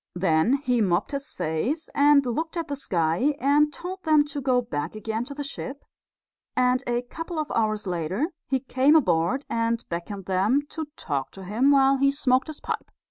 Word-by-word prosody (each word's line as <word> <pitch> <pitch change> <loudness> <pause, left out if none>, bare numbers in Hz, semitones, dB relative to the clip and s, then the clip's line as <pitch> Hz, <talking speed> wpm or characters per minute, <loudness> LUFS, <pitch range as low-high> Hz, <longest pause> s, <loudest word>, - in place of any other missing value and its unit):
Then 175 +4 +2
he 250 -3 +2
mopped 185 -1 +1
his 280 0 -4
face 185 - -2
and 285 -1 +5
looked 320 +8 -2
at 335 - -2
the 285 - -3
sky 185 - +1
and 295 +3 +3
told 370 +5 -7
them 310 -3 +4
to 285 - -3
go 255 -1 +2
back 165 -8 -4
again 220 +2 -3
to 280 - -8
the 290 - -4
ship; 280 0 -6 0.7
and 250 +1 +2
a 240 0 0
couple 330 +7 -7
of 305 -1 -2
hours 215 -2 0
later 185 - -2 0.2
he 265 -1 0
came 270 +3 +3
aboard 185 - +2
and 230 0 -1
beckoned 175 +3 -5
them 200 +9 +2
to 315 -1 -5
talk 135 -3 -3
to 195 - -10
him 220 +9 +2
while 275 -1 +5
he 275 +1 +3
smoked 260 -2 +1
his 310 -2 -7
pipe. - - -4
255 Hz, 190 wpm, -25 LUFS, 195-285 Hz, 0.7 s, and